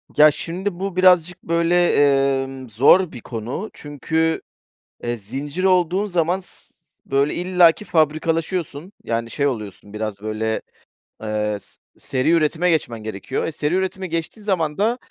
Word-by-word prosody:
Ya, 150 0 +7
şimdi 180 +4 -4
bu, 195 -2 -3
birazcık, 180 -2 +4
böyle, 170 +1 +2 0.5
emm, 130 -2 -8
zor 145 - +5
bir 120 - -9
konu. 120 - -5
Çünkü, 160 +3 -1 0.6
eee, 120 0 -1
zincir 140 - -5
olduğun 185 +1 +3
zaman 180 -1 0
s 180 - -11
s - - -22
böyle, 140 +2 +2
illaki 180 0 +3
fabrikalaşıyorsun, 160 +1 0
yani, 115 0 -2
şey 140 -1 +1
oluyorsun 105 -5 -6
biraz, 105 -2 -4
böyle, 110 +1 -2 0.6
eee, 105 -1 -1
s - - -17 0.2
seri 130 +5 0
üretime 170 +2 +2
geçmen 120 -9 -1
gerekiyor. 110 +4 -4
E, 165 - -2
seri 150 +3 -1
üretime 190 0 -2
geçtiğin 165 +6 -4
zaman 165 -7 0
da 225 +4 +1
160 Hz, 145 wpm, -21 LUFS, 125-180 Hz, 0.6 s, Ya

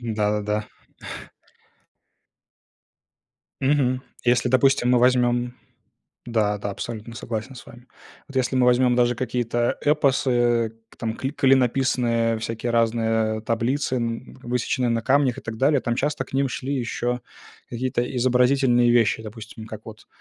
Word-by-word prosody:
Да-да-да. 105 -2 -1 2.9
Мгм. 130 -2 +1 0.2
Если, 120 0 +3
допустим, 130 -1 +3
мы 125 - +5
возьмем 125 0 +2 0.7
Да, 110 -3 0
да, 100 0 -4
абсолютно 115 +2 -7
согласен 115 +3 -5
с 125 - -12
вами. 120 +1 -14 0.4
Вот 135 - -4
если 130 +1 0
мы 125 -1 +3
возьмём 125 0 +4
даже 120 0 +3
какие-то 120 -1 -1
эпосы, 125 -6 +2 0.3
там 110 0 -3
кли 135 +2 -3
клинописные 125 -4 +2
всякие 115 +1 -4
разные 115 -1 +1
таблицы, 120 +4 -1
м, 115 +2 -4
высеченные 125 0 -1
на 115 -1 0
камнях 135 0 +2
и - - -7
так 110 0 -6
далее, 140 +2 +3
там 120 0 -1
часто 145 0 -1
к - - -18
ним 135 +1 +1
шли 135 +2 -4
ещё 125 -1 -2 0.5
какие-то 120 0 -1
изобразительные 125 0 +3
вещи. 115 -2 +3
Допустим, 110 0 -10
как 110 -1 -8
вот 110 -1 -12
120 Hz, 130 wpm, -23 LUFS, 115-130 Hz, 2.9 s, мы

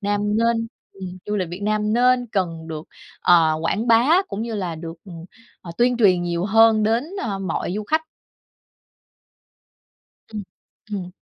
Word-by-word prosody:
Nam 205 0 0 0.2
nên 230 0 +1 0.3
ừm, 185 -1 -8
du 210 0 -1
lịch 185 -4 -2
Việt 180 +3 -7
nam 210 0 0
nên 245 +1 +3
cần 165 -5 -2
được, 155 -1 -5 0.4
ờ, 165 -3 +5
quảng 215 +8 -1
bá 250 +11 +5
cũng 210 +3 -4
như 230 -1 -4
là 180 -5 -3
được, 165 0 -7
ừm, 170 -3 -10 0.4
ờ, 170 - -9
tuyên 245 0 +3
truyền 185 -6 +4
nhiều 175 0 -2
hơn 220 +1 +5
đến, 225 +5 +1 0.2
ơ, 200 -4 -3
mọi 185 -2 -3
du 210 0 -3
khách. 315 +7 +1 2.3
Ừm, 210 -2 -6 0.5
ừm. 180 -3 -4
205 Hz, 160 wpm, -22 LUFS, 175-230 Hz, 2.3 s, ờ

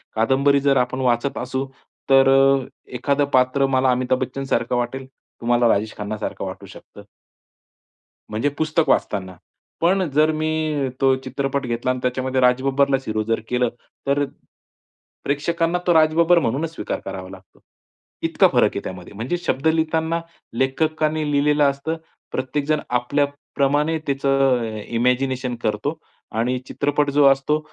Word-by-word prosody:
कादंबरी 135 +5 +3
जर 140 -1 +3
आपण 125 +1 0
वाचत 125 +2 0
असू, 130 +2 -3 0.4
तर 135 0 +6 0.7
एखादं 140 +2 +1
पात्र 130 +2 +3
मला 130 0 +3
अमिताभ 125 0 0
बच्चनसारखं 130 -2 -2
वाटेल, 125 +2 -3 0.4
तुम्हाला 120 0 +3
राजेश 105 +1 0
खन्नासारखं 105 0 -4
वाटू - - -7
शकतं. 105 - -14 1.3
म्हणजे 110 +7 0
पुस्तक 155 +1 +1
वाचताना, 95 -3 0 0.5
पण 185 +3 +3
जर 155 +2 +4
मी 155 -2 -1
तो 135 -1 +4
चित्रपट 135 +1 -2
घेतला 120 +1 -1
आणि 130 - -3
त्याच्यामध्ये 130 +1 -1
राजबब्बरला 135 +2 +3
हिरो 110 0 -1
जर 115 +1 0
केलं 125 -1 +1 0.4
तर 140 +1 +2 1.0
प्रेक्षकांना 165 +4 0
तो 175 - +5
राजबब्बर 165 +2 +4
म्हणून 140 +2 -1
स्वीकार 165 - -5
करावा 95 -1 -6
लागतो. 95 0 -15 0.6
इतका - - +4
फरक - - +4
आहे - - -2
त्यामध्ये. 90 0 -8
म्हणजे 120 - -3
शब्द 160 -4 -1
लिहिताना, 160 +1 +1 0.3
लेखकांनी 155 +5 0
लिहिलेलं 145 +1 +3
असतं, 140 +4 -1 0.3
प्रत्येकजण 145 +3 -1 0.2
आपल्याप्रमाणे 145 +3 0
त्याचं 135 -2 +2 0.2
इमॅजिनेशन 125 +1 0
करतो 110 +9 -1 0.4
आणि 125 +2 +1
चित्रपट 145 0 0
जो 145 0 +4
असतो, 135 +3 +1
135 Hz, 130 wpm, -21 LUFS, 125-150 Hz, 1.3 s, तर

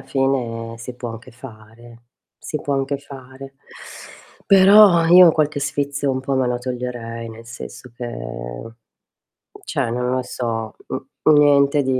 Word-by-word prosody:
fine 120 -4 -2
si 120 +2 -8
può 120 -1 -6
anche 115 +1 -11
fare, 115 -1 -14 0.3
si 150 - -5
può 140 - -2
anche 135 +1 -1
fare. 135 -1 -12 0.9
Però 195 -2 +7
io 175 0 +8
qualche 150 -2 0
sfizio 145 -1 -2
un 130 - -2
po' 135 +1 -2
me 130 -1 +1
lo 125 0 -1
toglierei, 120 -2 -6
nel 115 +1 -11
senso 120 +2 -10
che, 120 - -5 1.6
cioè - - -2
non 125 +1 -2
lo 130 0 0
so, 115 -3 -4
n - - -5 0.3
niente 145 -1 +4
di 130 -1 0
130 Hz, 140 wpm, -20 LUFS, 120-140 Hz, 1.6 s, io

